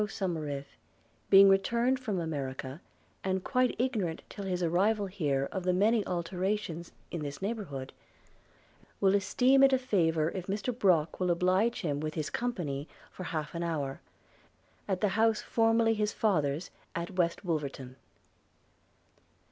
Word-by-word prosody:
Somerive 155 -9 -3 0.6
being 195 0 +9
returned 235 +7 +3
from 215 -8 -2
America, 140 -2 -4 0.4
and 190 -1 -1
quite 255 -1 +1
ignorant 215 -10 -1
till 200 - -7
his 180 -1 -1
arrival 200 +5 +2
here 145 -8 -1
of 190 - -3
the 180 0 +2
many 210 +4 +3
alterations 180 0 -2 0.2
in 170 - -4
this 145 -1 -5
neighbourhood, 190 - -4 1.1
will 195 -1 +4
esteem 250 +7 +3
it 275 0 +6
a - - +5
favour 165 -10 +1
if 185 -2 -6
Mr 205 +5 -2
Brock 175 -9 +2
will 180 -1 +1
oblige 185 +6 +2
him 145 -6 -1
with 155 0 -4
his 155 -2 -3
company 165 - -3 0.2
for 185 - -8
half 155 -3 -3
an 170 - -3
hour 150 -5 -2 0.4
– - - -36
at 190 -2 -1
the 210 - +3
house 220 +2 +2
formerly 225 0 +3
his 210 -1 0
father's, 160 -6 0 0.2
at 170 +2 -3
West 180 0 0
Wolverton. 140 -6 -3
185 Hz, 145 wpm, -30 LUFS, 160-210 Hz, 1.1 s, being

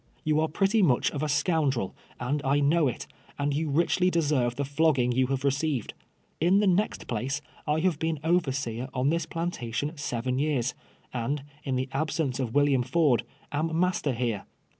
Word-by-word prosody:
You 155 0 +2
are 160 - +2
pretty 195 +7 +2
much 135 -10 +3
of 145 - -4
a 155 - -1
scoundrel, 145 - +1 0.2
and 140 +4 -1
I 140 +1 +2
know 150 +2 +3
it, 125 - -3 0.3
and 145 0 0
you 155 +2 -1
richly 170 +4 +2
deserve 145 -8 +1
the 140 +2 -1
flogging 140 -3 +2
you 130 +1 +2
have 135 0 -2
received. 140 -2 0 0.5
In 180 +5 +4
the 210 - +3
next 195 +3 +1
place, 125 +4 -2 0.3
I 150 +1 +1
have 175 -4 +1
been 160 -2 -1
overseer 135 -8 0
on 130 +3 +2
this 165 -1 -1
plantation 150 -4 -3
seven 125 -2 -2
years, 140 -4 0 0.4
and, 135 +4 -2 0.2
in 135 -2 -1
the 130 +1 -1
absence 140 -2 -1
of 130 -3 -1
IrYilliam 140 0 +3
Ford, 135 -1 +3 0.3
am 160 +2 -1
master 180 -6 +1
here. 115 -4 -2
145 Hz, 175 wpm, -27 LUFS, 130-160 Hz, 0.5 s, In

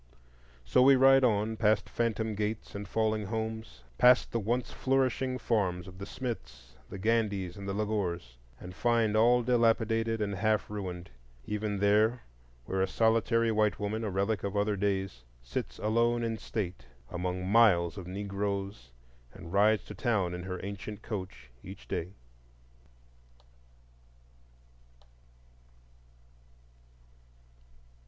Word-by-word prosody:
So 65 - +3
we 135 +1 +7
ride 135 +1 +6
on, 110 -2 +1
past 105 -2 +2
phantom 110 -2 -1
gates 105 +1 -3
and 100 0 -6
falling 110 0 0
homes,—past 110 - +1
the 115 - 0
once 120 +4 -1
flourishing 130 -1 0
farms 95 -8 -1
of 95 0 -12
the 100 - -6
Smiths, 65 - -7
the - - -7
Gandys, 105 -4 0
and 100 -1 -7
the - - -2
Lagores,—and 85 - -4
find 115 0 +1
all 120 +2 +4
dilapidated 115 -2 +2
and 105 -1 -1
half 110 +2 0
ruined, 90 -6 -6 0.3
even 105 -1 -2
there 105 +4 +3 0.4
where 95 +6 -1
a 95 - +2
solitary 115 +2 +2
white 105 -1 +1
woman, 110 +2 -2
a 110 - -1
relic 100 +3 -1
of 100 0 -2
other 105 0 +1
days, 95 -9 -2 0.2
sits - - -5
alone 115 +2 +1
in 115 -1 -2
state 95 - -5 0.2
among 90 +1 -3
miles 95 -6 +4
of 95 -3 -8
Negroes 100 - -4 0.4
and 90 -3 -11
rides 105 +2 +4
to - - -8
town 105 -8 0
in 90 - -5
her 90 -1 -4
ancient 100 +1 -7
coach 95 - -7
each - - -11
day. 90 +4 -4
105 Hz, 125 wpm, -30 LUFS, 95-115 Hz, 0.4 s, we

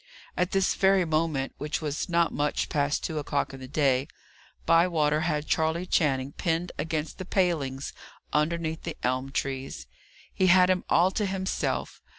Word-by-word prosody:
At 180 0 +1
this 195 -1 +2
very 190 -1 +3
moment, 155 -4 0
which 150 +1 -2
was 150 +2 -3
not 170 -1 +2
much 145 0 -1
past 145 0 0
two 155 -1 -2
o'clock 145 -1 -2
in 135 - -8
the 130 - -8
day, 135 -1 +1 0.6
Bywater 165 -3 +3
had 155 -2 -1
Charley 160 +3 0
Channing 135 -6 +1
pinned 170 +2 -1
against 155 0 -3
the - - -3
palings 160 -8 -1 0.4
underneath 160 +1 0
the 165 - -6
elm 130 +2 -1
trees. 135 - -3 0.5
He 190 - +2
had 180 0 +6
him 185 -1 0
all 180 +3 +4
to 210 0 -1
himself. 190 0 -2
160 Hz, 160 wpm, -27 LUFS, 145-175 Hz, 0.6 s, had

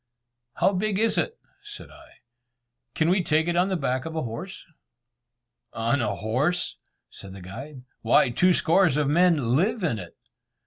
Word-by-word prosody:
"How 195 - +2
big 200 +1 -1
is 225 +2 +2
it?" 470 -1 -2 0.2
said 415 0 -11
I, - - -18 0.7
"can 160 - +1
we 185 +2 +3
take 160 -1 +1
it 175 - 0
on 180 +2 +2
the 190 - 0
back 130 -3 -2
of 160 0 -6
a 160 - -2
horse?" 120 +12 -7 1.1
"On 115 +4 0
a 105 -3 -1
horse!" 130 - -1 0.3
said 95 -1 -11
the 95 - -10
guide, 130 +8 -9 0.2
"why, 120 +2 +3
two 180 +8 +3
score 185 +3 +3
of 150 -2 0
men 150 -6 +2
live 200 - 0
in 130 -11 -1
it." 90 -2 -11
155 Hz, 170 wpm, -25 LUFS, 120-185 Hz, 1.1 s, we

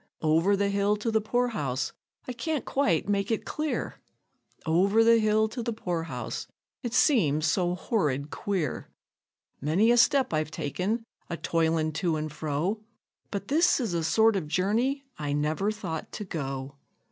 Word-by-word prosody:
Over 165 +6 +3
the 200 0 +1
hill 200 +1 +2
to 210 +2 -2
the 220 0 +2
poor 245 +3 +1
house 135 - -2 0.3
I 250 - -3
can't 290 +4 -2
quite 200 - +1
make 200 -1 0
it 225 - -1
clear! 305 -1 -3 0.6
Over 195 +7 +4
the 230 0 +6
hill 215 0 +3
to 240 +2 -5
the 235 0 -2
poor 175 -6 -2
house 125 -7 -5 0.3
it 240 -1 -3
seems 155 - +3
so 175 +2 +1
horrid 150 - -1
queer! 180 -10 -2 0.7
Many 175 - +3
a 240 - +4
step 265 - +4
I've 155 -1 0
taken 180 - -2 0.3
a 170 - -3
toilin' 160 -1 +1
to 170 -4 +1
and 155 0 -3
fro, 155 +8 -2 0.5
But 200 -1 -5
this 320 +4 +4
is 230 -8 -2
a 170 -1 0
sort 220 +7 +4
of 180 -6 -2
journey 230 - 0 0.2
I 145 -1 -2
never 155 +7 0
thought 185 -7 -5
to 210 - -5
go. 135 -5 -5
195 Hz, 165 wpm, -28 LUFS, 155-225 Hz, 0.7 s, the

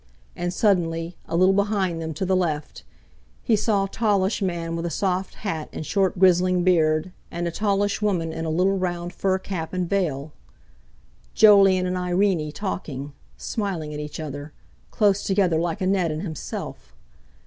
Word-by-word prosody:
And, 175 0 -2
suddenly, 170 -4 +1
a - - -3
little 185 +2 +5
behind 195 -4 0
them 160 0 -4
to 190 - -2
the 190 0 +2
left, 155 -5 -2 0.6
he 225 - +3
saw 205 -1 +1
a - - -1
tallish 205 -1 +1
man 170 -3 -2
with 170 +1 -2
a - - -2
soft 185 +1 -1
hat 165 -7 -4
and 155 - -6
short 195 +1 +1
grizzling 180 -1 +4
beard, 160 -1 +2 0.2
and 170 0 -3
a - - -2
tallish 205 +1 0
woman 175 -6 0
in 165 0 -4
a 160 - -2
little 185 +4 +2
round 175 -1 -3
fur 190 -1 +1
cap 185 -4 -5
and 180 -1 -1
veil. 155 -7 -1 1.0
Jolyon 195 -3 +6
and 180 0 -1
Irene 180 -3 +1
talking, 145 -7 -5 0.2
smiling 180 -8 -3
at 150 - -5
each 150 +1 -6
other, 145 -1 -6 0.4
close 205 -2 +2
together 190 -5 +2
like 175 +4 -2
Annette 185 -2 +1
and 155 +3 -3
himself! 140 - -7
180 Hz, 165 wpm, -24 LUFS, 165-195 Hz, 1.0 s, Jolyon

